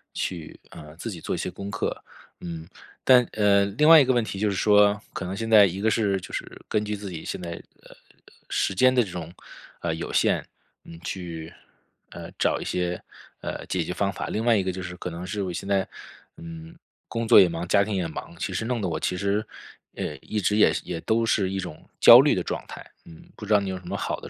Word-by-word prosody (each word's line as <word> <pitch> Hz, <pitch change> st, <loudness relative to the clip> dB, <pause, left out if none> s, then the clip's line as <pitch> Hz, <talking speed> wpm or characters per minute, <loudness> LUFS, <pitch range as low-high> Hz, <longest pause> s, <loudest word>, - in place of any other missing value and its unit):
去， 85 Hz, -4 st, -5 dB
呃， 75 Hz, 0 st, -12 dB
自 115 Hz, +7 st, -5 dB
己 85 Hz, -4 st, -8 dB
做 -, -, -2 dB
一 -, -, -5 dB
些 -, -, -3 dB
功 100 Hz, 0 st, -7 dB
课， -, -, -3 dB, 0.4 s
嗯。 85 Hz, -2 st, -7 dB, 0.4 s
但 125 Hz, -2 st, +6 dB
呃， 100 Hz, -2 st, +4 dB
另 120 Hz, +11 st, +2 dB
外 165 Hz, -1 st, +10 dB
一 140 Hz, -, +5 dB
个 130 Hz, -, +2 dB
问 120 Hz, -2 st, +2 dB
题 100 Hz, -3 st, -6 dB
就 105 Hz, -, +1 dB
是 100 Hz, -, -2 dB
说， 105 Hz, +1 st, +4 dB
可 95 Hz, -, -5 dB
能 95 Hz, +2 st, -4 dB
现 115 Hz, +2 st, -4 dB
在 105 Hz, -2 st, +8 dB
一 95 Hz, +1 st, -3 dB
个 110 Hz, -, +3 dB
是 100 Hz, -4 st, +1 dB
就 -, -, -10 dB
是 -, -, -4 dB, 0.2 s
根 105 Hz, 0 st, 0 dB
据 105 Hz, 0 st, -2 dB
自 100 Hz, -1 st, -7 dB
己 85 Hz, -3 st, -7 dB
现 -, -, -5 dB
在， 85 Hz, -1 st, -5 dB, 0.3 s
呃 -, -, -18 dB
呃， -, -, -15 dB, 0.5 s
时 95 Hz, -, 0 dB
间 130 Hz, +6 st, +5 dB
的 125 Hz, -1 st, +4 dB
这 100 Hz, -, -8 dB
种， 85 Hz, -1 st, -7 dB, 0.5 s
呃， 85 Hz, -2 st, -2 dB
有 80 Hz, -, -6 dB
限， -, -, +2 dB, 0.4 s
嗯， 85 Hz, 0 st, -12 dB
去， 85 Hz, -3 st, -6 dB, 0.6 s
呃， -, -, -9 dB
找 -, -, +1 dB
一 -, -, -4 dB
些， 90 Hz, -1 st, -2 dB, 0.4 s
呃， -, -, -5 dB
解 90 Hz, -2 st, -1 dB
决 80 Hz, -, -5 dB
方 100 Hz, +2 st, -1 dB
法。 -, -, -5 dB
另 110 Hz, +2 st, -2 dB
外 120 Hz, -1 st, +5 dB
一 100 Hz, -, +2 dB
个 95 Hz, -, -1 dB
就 95 Hz, 0 st, -6 dB
是 90 Hz, -1 st, -6 dB
可 90 Hz, -, -5 dB
能 85 Hz, +1 st, -7 dB
是 100 Hz, +2 st, -3 dB
我 95 Hz, -2 st, -3 dB
现 90 Hz, -, -6 dB
在， 100 Hz, -1 st, +1 dB, 0.5 s
嗯， 165 Hz, 0 st, -10 dB, 0.3 s
工 115 Hz, -1 st, -3 dB
作 -, -, +8 dB
也 90 Hz, -, +4 dB
忙， 85 Hz, +1 st, -4 dB
家 100 Hz, -, +4 dB
庭 105 Hz, 0 st, -3 dB
也 90 Hz, -3 st, -1 dB
忙， 80 Hz, +1 st, -8 dB
其 -, -, -4 dB
实 110 Hz, -, -2 dB
弄 125 Hz, 0 st, -1 dB
得 95 Hz, -, -1 dB
我 80 Hz, -2 st, -2 dB
其 90 Hz, -, -2 dB
实， 100 Hz, +2 st, 0 dB, 0.5 s
呃， -, -, -4 dB
一 105 Hz, -, -4 dB
直 105 Hz, +1 st, +1 dB
也 105 Hz, -, +5 dB
也 85 Hz, -2 st, -5 dB
都 115 Hz, +4 st, +1 dB
是 100 Hz, -4 st, +1 dB
一 95 Hz, -, -3 dB
种 80 Hz, -4 st, -8 dB
焦 -, -, +10 dB
虑 -, -, +4 dB
的 -, -, -1 dB
状 -, -, -4 dB
态。 -, -, -10 dB, 0.2 s
嗯， 80 Hz, -, -14 dB
不 105 Hz, -, -9 dB
知 -, -, -5 dB
道 105 Hz, -, +6 dB
你 100 Hz, -1 st, -4 dB
有 95 Hz, -, -5 dB
什 90 Hz, -, -14 dB
么 -, -, -3 dB
好 -, -, -2 dB
的 -, -, -10 dB
100 Hz, 270 characters per minute, -25 LUFS, 90-110 Hz, 0.6 s, 外